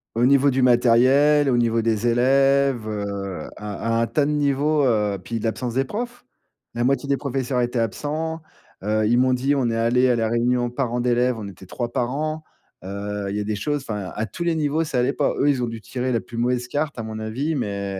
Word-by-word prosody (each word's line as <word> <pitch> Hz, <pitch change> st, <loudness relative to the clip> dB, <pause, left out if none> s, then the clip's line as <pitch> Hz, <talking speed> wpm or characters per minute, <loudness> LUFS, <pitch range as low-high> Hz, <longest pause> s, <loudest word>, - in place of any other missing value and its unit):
au 120 Hz, +2 st, +3 dB
niveau 140 Hz, +1 st, +5 dB
du 130 Hz, -1 st, +1 dB
matériel, 130 Hz, +4 st, +4 dB
au 120 Hz, -, +2 dB
niveau 115 Hz, -1 st, +1 dB
des 115 Hz, +1 st, +1 dB
élèves, 135 Hz, 0 st, +3 dB
heu, 100 Hz, -5 st, -4 dB
à 105 Hz, +2 st, -2 dB
à -, -, +2 dB
à -, -, +2 dB
un 115 Hz, -, +1 dB
tas 145 Hz, +3 st, +1 dB
de 150 Hz, -, 0 dB
niveaux, 145 Hz, +1 st, +1 dB
heu, 105 Hz, -6 st, +1 dB
puis 115 Hz, +2 st, -4 dB
de -, -, -8 dB
l'absence 120 Hz, +1 st, -2 dB
des 135 Hz, -, +2 dB
profs. 245 Hz, -, -6 dB, 0.5 s
La 120 Hz, -, -1 dB
moitié 140 Hz, +3 st, +1 dB
des 140 Hz, -, +2 dB
professeurs 135 Hz, -2 st, -1 dB
étaient 120 Hz, +1 st, -1 dB
absents. 155 Hz, -, -2 dB, 0.4 s
Heu, 110 Hz, +1 st, +1 dB
ils 120 Hz, +2 st, +3 dB
m'ont 130 Hz, 0 st, +3 dB
dit: 135 Hz, +3 st, +1 dB
«On 130 Hz, -4 st, +1 dB
est 115 Hz, -, -1 dB
allés 125 Hz, +3 st, +3 dB
à 125 Hz, -, +3 dB
la 115 Hz, -1 st, 0 dB
réunion 120 Hz, +1 st, +1 dB
parents 125 Hz, -1 st, -2 dB
d'élèves, 125 Hz, 0 st, +2 dB
on 105 Hz, -2 st, -6 dB
était 95 Hz, -1 st, -12 dB
3 120 Hz, +2 st, -4 dB
parents». 155 Hz, +6 st, -2 dB, 0.4 s
Heu, 100 Hz, +1 st, -4 dB
il 100 Hz, -, -3 dB
y -, -, -1 dB
a -, -, -1 dB
des 105 Hz, +1 st, -2 dB
choses 145 Hz, +5 st, -2 dB
enfin 105 Hz, -4 st, -4 dB
à 110 Hz, -, -1 dB
tous 170 Hz, -, -6 dB
les 170 Hz, -1 st, +1 dB
niveaux, 155 Hz, +1 st, 0 dB
ça 150 Hz, -5 st, -3 dB
allait 125 Hz, +3 st, +1 dB
pas. 145 Hz, -, 0 dB
Eux, 145 Hz, -, +3 dB
ils 135 Hz, -3 st, +1 dB
ont 120 Hz, -, 0 dB
dû 115 Hz, 0 st, -6 dB
tirer 125 Hz, +3 st, -3 dB
la 115 Hz, -, +1 dB
plus 120 Hz, -, -10 dB
mauvaise 125 Hz, +1 st, 0 dB
carte 145 Hz, +3 st, -2 dB
à 115 Hz, -, -4 dB
mon 110 Hz, 0 st, -6 dB
avis, 125 Hz, +9 st, -2 dB
mais 100 Hz, -7 st, -3 dB
125 Hz, 235 wpm, -23 LUFS, 110-140 Hz, 0.5 s, niveau